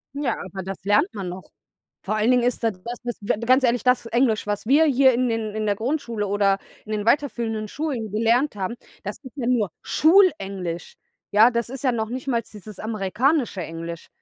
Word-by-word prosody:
N 285 - -3
Ja, 245 -5 +1
aber 190 0 -7
das 190 0 -7
lernt 210 - +3
man 195 -4 -4
noch. 180 +1 -9 0.5
Vor 210 +2 -1
allen 215 +3 +3
Dingen 250 -1 +3
ist 245 0 0
da 225 - +3
das 235 +6 -8
ist 240 - -4
d 205 +2 0
ganz 255 +2 +4
ehrlich, 245 -1 +2
das 250 -1 +3
Englisch, 230 -2 +1
was 205 0 -2
wir 285 +7 +5
hier 265 -2 +5
in 250 +1 +1
in 220 -2 -2
in 215 0 -1
der 205 -1 +1
Grundschule 230 -3 -2
oder 200 -1 +2 0.3
in 215 - -8
den 210 -1 -2
weiterführenden 230 -4 0
Schulen 265 -8 -3
gelernt 230 +5 +2
haben, 195 +3 -3 0.3
das 205 0 -5
ist 260 - -10
ja 255 -5 -3
nur 235 -6 +2
Schulenglisch. 195 - +2 0.4
Ja, 215 +3 +7
das 235 -1 -2
ist 265 +1 -7
ja 260 - +3
noch 220 -2 -2
nicht 255 +3 -5
mal 235 -3 +1
dieses 215 -2 -12
amerikanische 220 - 0
Englisch. 165 0 -7
225 Hz, 205 wpm, -23 LUFS, 205-255 Hz, 0.5 s, Ja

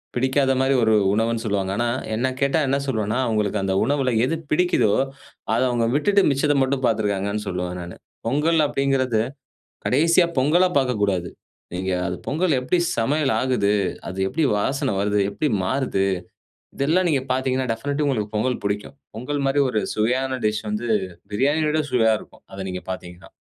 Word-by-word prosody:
பிடிக்காத 130 +2 +2
மாரி 135 +1 +2
ஒரு 110 0 +3 0.2
உணவுன்னு 115 +1 0
சொல்லுவாங்க. 100 -2 -1
ஆனா 120 0 +1 0.3
என்னை 130 +3 0
கேட்டா 140 +4 +2
என்ன 135 +1 +2
சொல்லுவேன்னா, 110 -2 -1
அவங்களுக்கு 105 -2 0
அந்த 95 -1 0
உணவுல 135 0 +1
எது 165 +5 -1 0.2
பிடிக்குதோ 155 - +3 0.6
அத 115 - +2
அவங்க 120 -2 +1
விட்டுட்டு 200 +6 +3
மிச்சத 145 +1 +2
மட்டும் 130 0 0
பாத்துருக்காங்கன்னு 105 -2 0
சொல்லுவேன் 90 0 -3
நானு. 85 0 -9 0.3
பொங்கல் 155 +5 +2
அப்டீங்குறது 135 -5 +1 0.6
கடைசியா 165 +6 +4
பொங்கலா 170 +8 +4
பாக்கக்கூடாது. 100 -8 0 0.4
நீங்க 95 +1 -2 0.2
அது 90 - -2
பொங்கல் 155 0 +1
எப்படி 130 +8 +1 0.2
சமையல் 140 +4 +1
ஆகுது? 125 -6 +1 0.4
அது 95 - -6
எப்படி 160 +9 -1
வாசனை 135 +4 0
வருது? 105 +1 +1
எப்படி 150 - -1 0.2
மாறுது? 125 -4 0 0.7
இதெல்லாம் 165 +7 +2
நீங்க 135 -3 +1
பாத்தீங்கன்னா, 130 0 0
டெஃபினைட்லி 145 +5 -2
உங்களுக்கு 110 -6 -1
பொங்கல் 125 +3 0
பிடிக்கும். 105 +6 -3 0.2
பொங்கல் 140 +4 -3
மாதிரி 140 +1 +2
ஒரு 110 - 0
சுவையான 130 +4 0
டிஷ் 105 +1 -1
வந்து 110 +3 -3 0.4
பிரியாணிய 145 +8 +1
விட 155 0 +1
சுவையா 110 -3 +4
இருக்கும். - - -17
அத 95 - -8
நீங்க 90 0 -5
பார்த்தீங்கன்னா 90 -1 -8
125 Hz, 155 wpm, -22 LUFS, 105-140 Hz, 0.7 s, கடைசியா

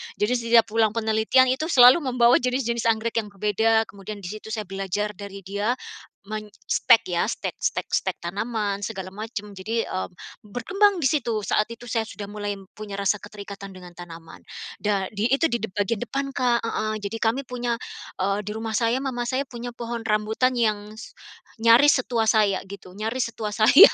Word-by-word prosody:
jadi 210 +4 0
setiap 235 -1 +4
pulang 220 -1 +2
penelitian 225 +3 +3
itu 270 +5 -1
selalu 255 -1 +8
membawa 245 -4 +4
jenis-jenis 250 0 -1 0.2
anggrek 225 +1 0
yang 220 -2 0
berbeda 220 +3 +2
kemudian 200 +1 -8
di 175 - -6
situ 215 +2 -8
saya 215 - -2
belajar 195 +2 -2
dari 200 0 -8
dia, 200 +5 -1 0.6
menstek 215 +1 +2
ya, 175 -1 +1
stek - - -4
stek - - -2
stek - - 0
tanaman 205 +3 -2
segala 190 -4 -5
macam 210 +1 -6
jadi, 225 +4 -2
eee, 185 - -2 0.4
berkembang 365 - +1
di 270 - +4
situ 235 -8 0
saat 210 +1 +1
itu 240 +1 -11
saya 225 -1 0
sudah 205 -2 -8
mulai 205 0 -3 0.2
punya 210 -2 -7
rasa 200 +1 +2
keterikatan 200 -1 -9
dengan 180 -1 -11
tanaman, 165 -2 -11 0.3
da 200 -2 -1
di 210 +1 -2
itu 325 +4 +3
di 235 - 0
dep 220 - -4
bagian 205 +2 0
depan, 275 +3 -3
Kak 245 -2 +2
heeh, 215 -1 -2
jadi 205 +2 -4
kami 225 +4 +1
punya 245 -1 -1 0.5
eee, 195 +1 +1
di 210 - -4
rumah 220 0 -3
saya 235 +2 +1
mama 250 -3 -2
saya 260 +3 0
punya 240 0 -6
pohon 235 -1 -5
rambutan 220 +4 +1
yang 215 -3 0
s 220 - -11 0.5
nyaris 245 +5 +7
setua 225 -3 +1
saya 210 -4 +3
gitu, 190 -2 -10
nyaris 225 +3 -2
setua 215 -2 -3
saya. 230 - +8
220 Hz, 180 wpm, -24 LUFS, 205-240 Hz, 0.6 s, selalu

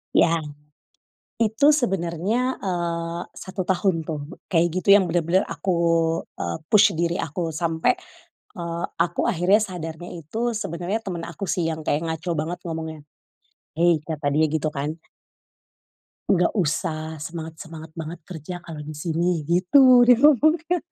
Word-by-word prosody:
Iya. - - +6 1.1
Itu 220 +4 +2 0.2
sebenarnya, 190 0 -1 0.2
eee, 170 -2 -2 0.2
1 185 0 -4
tahun 190 0 +2
tuh 155 -2 -3 0.3
kayak 170 -1 +4
gitu 185 0 -3
yang 195 -3 +4
bener-bener 175 +2 +2
aku, 190 - -2 0.7
eee, 85 -1 -3
push 210 -1 +6
diri 170 0 +1
aku 160 +4 -3 0.2
sampai, 165 +9 +2 0.6
eee, 170 -1 -4
aku 170 +1 +1
akhirnya 190 +3 +3
sadarnya 175 -3 -6
itu 160 +7 -7 0.2
sebenarnya 180 +3 -2
temen 175 -3 -4
aku 170 +3 -6
sih 175 -1 0
yang 160 0 -4
kayak 145 +2 +1
ngaco 160 +2 -3
banget 170 +3 -4
ngomongnya, 160 -2 -5 0.8
"Hei," 170 +1 +4
kata 155 -2 -4
dia 155 +1 +4
gitu 155 -1 0
kan. 150 +3 -4 1.3
"Nggak 180 -2 +3
usah, 160 -3 -1
semangat 160 +1 -6
semangat 160 -1 -10
banget 165 +2 -6
kerja 175 0 -7
kalau 160 -3 -8
di 155 - -6
sini." 165 +2 -1
Gitu 245 +8 +6
dia 245 -1 +7
ngomongnya. 310 +4 +4
170 Hz, 140 wpm, -23 LUFS, 160-190 Hz, 1.3 s, dia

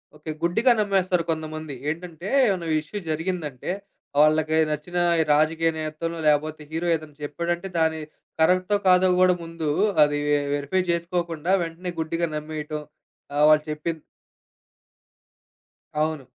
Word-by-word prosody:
Okay. 155 +1 -6
గుడ్డిగా 225 +9 +3
నమ్మేస్తారు 190 -4 +1
కొందమంది. 155 -2 -5
ఏంటంటే, 170 +3 -5 0.2
ఏమైనా 185 -5 -1
ఇష్యూ 155 +7 -8
జరిగిందంటే, 160 -3 -3 0.5
వాళ్ళకి 155 +1 +4 0.2
నచ్చిన 150 +4 -4 0.2
ఈ - - +4
రాజకీయ 160 +2 +2
నేతల‌నో, 155 +2 -4
లేకపోతే 150 +1 +1
హీరో 165 +2 -2
ఏదైనా 155 -2 -8
చెప్పాడంటే 170 +5 -2
దాన్ని 160 -1 +1 0.4
కరెక్టో 185 +5 +3
కాదో 185 0 +6
గూడా 185 0 +6
ముందు 165 -2 -4 0.3
అది 145 0 +1
వె 145 0 +3 0.2
వెరిఫై 145 +6 0
జేసుకోకుండా 170 -1 -1
వెంటనే 170 +2 -6
గుడ్డిగా 165 +1 -1
నమ్మేయటం, 150 0 -4 0.5
ఆహ్ 150 +1 +5
వాళ్ళు 155 0 +5
చెప్పింది 155 +1 -4 2.0
అవును. 155 -2 0
160 Hz, 120 wpm, -24 LUFS, 155-175 Hz, 2.0 s, కాదో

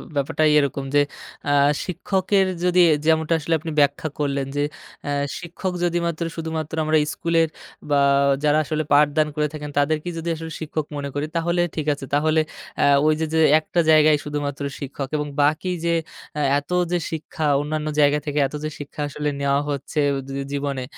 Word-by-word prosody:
ব্যাপারটাই 150 +2 +2
এরকম 140 -1 -1
যে, 145 - +6 0.5
আ - - +3 0.3
শিক্ষকের 190 +2 +1 0.2
যদি 180 0 +3
এ - - +5
যেমনটা 160 0 +3
আসলে 165 +2 -1
আপনি 160 +1 -5
ব্যাখ্যা 145 +2 +2
করলেন 140 -2 -1
যে, 145 - +1 0.4
আ - - -1 0.3
শিক্ষক 180 +2 -4
যদিমাত্র, 170 -1 0
শুধুমাত্র 160 -1 -4
আমরা 155 0 +3
স্কুলের 165 +1 +1 0.4
বা 145 -1 +3 0.4
যারা 150 0 +4
আসলে 155 +1 -2
পাঠদান 150 +1 +4
করে 150 0 +1
থাকেন, 150 -1 -6
তাদেরকেই 155 +4 0
যদি 170 +1 -3
আসলে 160 0 -7
শিক্ষক 155 -1 -3
মনে 140 0 -4
করি, 145 +1 -1
তাহলে 170 +1 +1
ঠিক 155 -1 -3
আছে। 140 -1 -7
তাহলে 155 +2 +3 0.4
আ - - +5 0.2
ওইযে, 155 +1 +2
যে, - - +2
যে, - - +6
একটা 170 +2 -2
জায়গায় 155 -1 +6
শুধুমাত্র 145 -1 -3 0.2
শিক্ষক 140 0 -5
এবং 150 0 -2
বাকি 155 +5 +1
যে, 170 - +2 0.4
আ - - 0 0.2
এত 145 - -16 0.2
যে, 175 - +2
শিক্ষা, 160 0 -4 0.2
অন্যান্য 155 +1 -3
জায়গা 145 0 +4
থেকে 145 0 -1
এত 150 - -9
যে, 155 - -1
শিক্ষা 145 +1 -7
আসলে 150 +1 -2
নেয়া 140 0 +2
হচ্ছে 145 +2 -3 0.2
উদ 135 0 -7
জী 140 - -2
জীবনে, 140 -2 -2
155 Hz, 175 wpm, -22 LUFS, 145-160 Hz, 0.5 s, যে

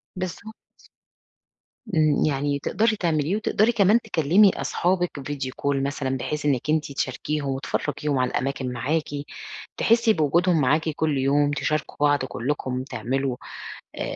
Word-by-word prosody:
بالضبط. 185 +4 -6 1.4
امم. 155 -2 +3
يعني 140 -1 0
تقدري 220 +8 +1
تعمليه، 165 -1 0
وتقدري 215 +1 +2
كمان 210 +1 +4
تكلمي 190 0 +4
أصحابِك 180 -4 -1
video 135 -1 -4
call 140 0 +1
مثلًا، 135 -2 -2
بحيث 150 +3 -3
إنكِ 140 0 0
أنتِ 155 -2 +1
تشاركيهم 140 +2 -2
وتفرجيهم 140 +1 -2
على 125 - +1
الأماكن 130 -1 -2
معاكِ، 150 +6 -1 0.7
تحسي 230 -1 +4
بوجودهم 165 +1 +2
معاكِ 155 +5 +2
كل 155 -1 0
يوم، 145 +2 +2
تشاركوا 155 +1 -2
بعض 145 -2 +2
كلكم 130 0 -3
تعملوا، 130 +1 -2 0.6
آآ، - - -3
145 Hz, 125 wpm, -24 LUFS, 135-170 Hz, 1.4 s, كمان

